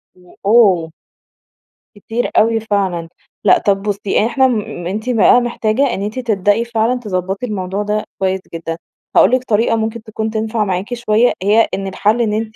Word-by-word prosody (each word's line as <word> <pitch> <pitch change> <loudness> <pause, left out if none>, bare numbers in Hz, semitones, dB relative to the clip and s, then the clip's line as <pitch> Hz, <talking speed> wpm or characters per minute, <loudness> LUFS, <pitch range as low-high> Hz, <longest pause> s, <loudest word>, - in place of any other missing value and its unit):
و 180 -1 -20
أُوه! 195 -7 +4 1.0
كتير 225 +4 -3
أوي 225 +1 +3
فعلًا. 195 -6 -2 0.3
لأ، - - +5
طب 195 -1 0
بُصي 205 0 0
إحنا 265 +3 +3
مم 210 -7 -3
أنتِ 215 +6 -4
بقى 245 +1 +5
محتاجة 240 +2 0
إن - - -4
أنتِ 215 +5 -4
تبدئي 215 -1 +1
فعلًا 235 +1 0
تضَبَّطي 195 0 -3
الموضوع 195 -2 -3
ده 210 +1 -1 0.2
كويس 190 0 0
جدًا. 165 0 -5 0.4
هاقول - - +6
لك 255 0 +2
طريقة 225 -2 +1
ممكن 220 0 -3
تكون 220 0 -4
تنفع 220 0 -1
معاكِ 190 +4 -3
شوية، 235 0 +2
هي 215 +3 +4
إن 195 0 -3
الحل 210 +5 +1
إن 215 -3 0
أنتِ 220 0 -3
215 Hz, 165 wpm, -17 LUFS, 195-230 Hz, 1.0 s, هاقول